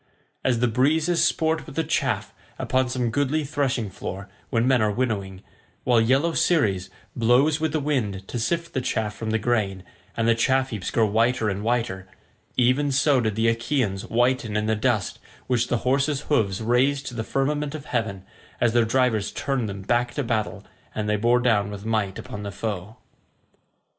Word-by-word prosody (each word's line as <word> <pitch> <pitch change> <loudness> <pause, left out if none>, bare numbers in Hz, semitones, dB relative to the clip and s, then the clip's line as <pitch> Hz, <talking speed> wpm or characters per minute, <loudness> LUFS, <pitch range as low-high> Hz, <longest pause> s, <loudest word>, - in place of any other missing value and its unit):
As 120 -3 +1
the 125 - +4
breezes 155 +8 +2
sport 160 0 +1
with 150 - -10
the 160 - +1
chaff 160 - -1 0.2
upon 130 -1 0
some 125 -2 -1
goodly 145 +5 0
threshing 135 -7 -1
floor, 95 +2 -6 0.2
when 115 +1 +1
men 130 -3 +4
are 105 - +3
winnowing—while 105 +1 -2
yellow 135 +8 +2
Ceres 100 - +1 0.3
blows 125 +7 +3
with 160 -1 0
the 155 - 0
wind 110 -10 -2
to 120 - -4
sift 170 +8 -1
the 130 - 0
chaff 110 -3 -1
from 110 -1 -4
the 110 - +2
grain, 105 -5 -1 0.3
and 115 0 +1
the 115 - +5
chaff 130 +3 +1
heaps 105 -5 -3
grow 115 - +2
whiter 115 +2 +2
and 100 0 -3
whiter—even 120 +5 -1
so 140 -1 +3
did 110 -3 -1
the 110 +1 +2
Achaeans 115 -4 0
whiten 120 -2 +1
in 105 - 0
the 110 0 +1
dust 110 -2 0 0.3
which 125 -3 +1
the 120 - +1
horses' 140 +2 +1
hoofs 110 -10 0
raised 130 +5 +2
to - - -5
the 115 -2 -3
firmament 145 +4 -1
of 150 -1 -7
heaven, 100 -8 -2 0.3
as 120 -2 +2
their 120 -1 +4
drivers 115 -3 +1
turned 130 -6 -2
them 100 0 -6
back 120 +3 0
to 145 - -1
battle, 110 -3 -2 0.3
and 105 -1 -2
they 105 - +2
bore 120 +3 +3
down 105 -5 +2
with 100 0 -8
might 110 -4 -1
upon 105 - -7
the 100 -1 -5
foe. 100 +1 -5
120 Hz, 180 wpm, -24 LUFS, 105-135 Hz, 0.3 s, the